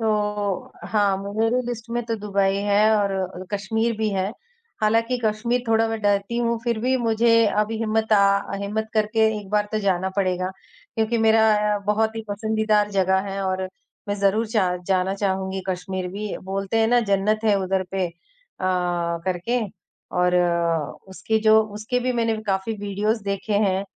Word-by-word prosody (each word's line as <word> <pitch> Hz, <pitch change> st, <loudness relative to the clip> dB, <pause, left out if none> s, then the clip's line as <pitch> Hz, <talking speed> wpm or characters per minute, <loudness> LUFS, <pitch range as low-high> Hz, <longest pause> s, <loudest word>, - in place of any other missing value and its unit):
तो 210 Hz, -2 st, -1 dB, 0.2 s
हाँ, 205 Hz, -3 st, +2 dB, 0.2 s
मेरी 225 Hz, +3 st, +2 dB
लिस्ट 235 Hz, -1 st, -6 dB
में 240 Hz, +1 st, -1 dB
तो 230 Hz, 0 st, -2 dB
दुबई 200 Hz, -2 st, 0 dB, 0.2 s
है 210 Hz, +2 st, +5 dB
और 190 Hz, -2 st, -2 dB
कश्मीर 220 Hz, +3 st, -1 dB
भी 220 Hz, -, +1 dB
है। 195 Hz, +1 st, -1 dB, 0.5 s
हालाँकि 230 Hz, +3 st, +2 dB
कश्मीर 235 Hz, +3 st, 0 dB
थोड़ा 225 Hz, 0 st, +3 dB
मैं 225 Hz, 0 st, -3 dB
डरती 205 Hz, +2 st, +1 dB
हूँ, 235 Hz, -1 st, 0 dB
फिर 235 Hz, -2 st, 0 dB
भी 260 Hz, +2 st, +2 dB
मुझे 230 Hz, -1 st, +2 dB, 0.3 s
अभी 215 Hz, +1 st, +1 dB
हिम्मत, 220 Hz, 0 st, 0 dB
अ, 200 Hz, -1 st, +3 dB
हिम्मत 220 Hz, +2 st, -2 dB
करके 215 Hz, +1 st, +1 dB, 0.2 s
एक 205 Hz, -, -10 dB
बार 210 Hz, 0 st, +1 dB
तो 215 Hz, -, +1 dB
जाना 190 Hz, -2 st, 0 dB
पड़ेगा, 185 Hz, -1 st, 0 dB, 0.5 s
क्योंकि 225 Hz, +1 st, +1 dB
मेरा 220 Hz, 0 st, +4 dB, 0.3 s
अ, -, -, -1 dB
बहुत 220 Hz, +1 st, +1 dB
ही 225 Hz, -, -3 dB
पसंदीदा 215 Hz, 0 st, +1 dB
जगह 190 Hz, 0 st, +3 dB
है 195 Hz, 0 st, -3 dB
और 185 Hz, 0 st, -1 dB, 0.5 s
मैं 205 Hz, -, 0 dB
ज़रूर 210 Hz, +3 st, +2 dB
जा 190 Hz, -5 st, +1 dB
जाना 190 Hz, 0 st, +1 dB
चाहूँगी 190 Hz, -1 st, -2 dB
कश्मीर 185 Hz, 0 st, -3 dB
भी। 205 Hz, +1 st, -4 dB
बोलते 195 Hz, +2 st, -2 dB
हैं 225 Hz, -, +4 dB
ना 245 Hz, 0 st, +4 dB
जन्नत 210 Hz, +2 st, +2 dB
है 210 Hz, -2 st, +4 dB
उधर 190 Hz, 0 st, 0 dB
पे 190 Hz, -2 st, 0 dB
अ, -, -, -15 dB, 0.5 s
करके 180 Hz, +4 st, -1 dB, 0.6 s
और 180 Hz, 0 st, +3 dB, 0.7 s
उसके 220 Hz, +3 st, -1 dB
जो, 220 Hz, 0 st, +6 dB
उसके 215 Hz, +3 st, -3 dB
भी 255 Hz, +1 st, 0 dB
मैंने 230 Hz, -2 st, 0 dB
काफ़ी 195 Hz, +2 st, 0 dB
वीडियोज़ 205 Hz, +2 st, -1 dB
देखे 200 Hz, +1 st, -2 dB
हैं। 190 Hz, +1 st, 0 dB
210 Hz, 165 wpm, -23 LUFS, 195-225 Hz, 0.7 s, जो